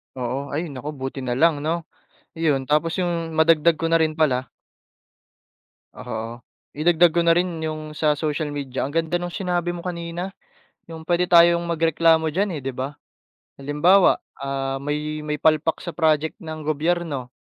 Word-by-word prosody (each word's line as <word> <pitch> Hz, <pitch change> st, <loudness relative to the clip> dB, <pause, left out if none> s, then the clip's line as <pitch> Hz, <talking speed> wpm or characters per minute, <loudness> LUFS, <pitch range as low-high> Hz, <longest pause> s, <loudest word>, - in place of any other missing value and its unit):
Oo, 130 Hz, +3 st, -3 dB
ay 160 Hz, +1 st, -2 dB
naku 140 Hz, +3 st, -6 dB
buti 135 Hz, 0 st, -5 dB
nalang 145 Hz, +5 st, +2 dB
'no, 160 Hz, +3 st, -2 dB, 0.5 s
iyon 150 Hz, -5 st, 0 dB
tapos 155 Hz, +4 st, +1 dB
yung 170 Hz, -2 st, -1 dB
madagdag 160 Hz, 0 st, +4 dB
ko 165 Hz, -, -1 dB
na 165 Hz, 0 st, +3 dB
rin 155 Hz, 0 st, -1 dB
pala. 130 Hz, -5 st, +1 dB, 1.5 s
Oo, -, -, -7 dB, 0.6 s
idagdag 170 Hz, +1 st, +4 dB
ko 170 Hz, -, +3 dB
na 170 Hz, -, +3 dB
rin 175 Hz, -3 st, -2 dB
yung 155 Hz, -1 st, -5 dB
sa 150 Hz, -1 st, +1 dB
social 150 Hz, -1 st, -2 dB
media 140 Hz, -3 st, -4 dB
ang 135 Hz, -, -2 dB
ganda 165 Hz, +2 st, -1 dB
nung 175 Hz, 0 st, -1 dB
sinabi 175 Hz, -1 st, -1 dB
mo 175 Hz, -, -5 dB
kanina, 175 Hz, +2 st, -5 dB, 0.6 s
yung 160 Hz, -1 st, -9 dB
pwede 175 Hz, +1 st, +1 dB
tayong 170 Hz, 0 st, +6 dB
magreklamo 165 Hz, -1 st, +2 dB
diyan 200 Hz, +1 st, +1 dB
eh, -, -, -7 dB
'di 135 Hz, -, -3 dB
ba. 135 Hz, +3 st, -5 dB, 0.6 s
Halimbawa, 150 Hz, +8 st, +4 dB, 0.2 s
ah, 135 Hz, 0 st, -3 dB
may 150 Hz, +2 st, -3 dB
may 150 Hz, -1 st, -3 dB
palpak 160 Hz, 0 st, +2 dB
sa 170 Hz, -, -7 dB
project 160 Hz, -2 st, +1 dB
ng 155 Hz, 0 st, -6 dB
gobyerno 155 Hz, -3 st, -2 dB
160 Hz, 160 wpm, -23 LUFS, 145-170 Hz, 1.5 s, tayong